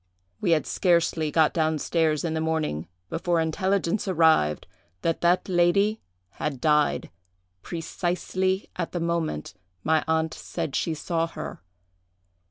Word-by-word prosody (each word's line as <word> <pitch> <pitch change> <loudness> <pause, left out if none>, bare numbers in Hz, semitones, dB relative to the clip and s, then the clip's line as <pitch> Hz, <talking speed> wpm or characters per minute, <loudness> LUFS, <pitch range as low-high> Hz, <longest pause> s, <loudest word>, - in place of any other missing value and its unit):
We - - 0
had 160 -2 +3
scarcely 170 -3 +2
got 155 0 +3
down 160 -1 +1
stairs 155 -1 +1
in 160 - -1
the 160 - -1
morning, 155 - -1 0.2
before 170 +1 +1
intelligence 190 +4 0
arrived 160 - +3 0.4
that 165 - 0
that 175 +1 +3
lady 200 +4 +3 0.3
had 140 +4 -4
died, 150 +1 +2 0.5
precisely 185 - -2
at - - -3
the 175 - -1
moment 165 - -2 0.3
my 160 -1 +2
aunt 160 0 +1
said 140 - -4
she 165 - 0
saw 165 +1 -1
her. 165 - -7
165 Hz, 130 wpm, -26 LUFS, 155-175 Hz, 0.5 s, had